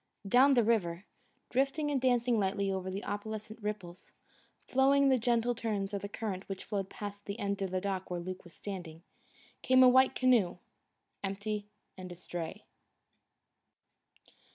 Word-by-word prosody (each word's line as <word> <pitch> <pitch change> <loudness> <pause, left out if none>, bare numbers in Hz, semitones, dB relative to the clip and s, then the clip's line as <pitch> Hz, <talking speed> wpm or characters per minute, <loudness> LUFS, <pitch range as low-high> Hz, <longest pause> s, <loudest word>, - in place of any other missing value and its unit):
Down 265 +6 +6
the 240 - +5
river, 195 -5 +1 0.5
drifting 275 +3 +1
and 270 -3 0
dancing 245 -2 +3
lightly 200 0 0
over 190 -1 -3
the 195 +2 -4
opalescent 215 +2 -5
ripples, 200 -4 -6 0.6
following 275 +1 +4
the 260 -1 +4
gentle 235 +1 +2
turns 210 -4 -2
of 200 - -2
the 200 - -5
current 205 -4 -5
which 195 -1 -5
flowed 195 -3 -3
past 205 0 -7
the 200 - -4
end 200 0 -2
of 195 - -1
the 185 0 -1
dock 190 -1 -3
where 175 -1 -2
Luke 185 +1 -6
was 175 - -16
standing, 175 -5 -7 0.6
came 260 0 +6
a - - +9
white 260 +1 +5
canoe, 240 -9 +3 0.7
empty 205 +1 -3 0.3
and 185 -1 -7
astray. 175 -1 -6
205 Hz, 155 wpm, -32 LUFS, 190-245 Hz, 0.7 s, a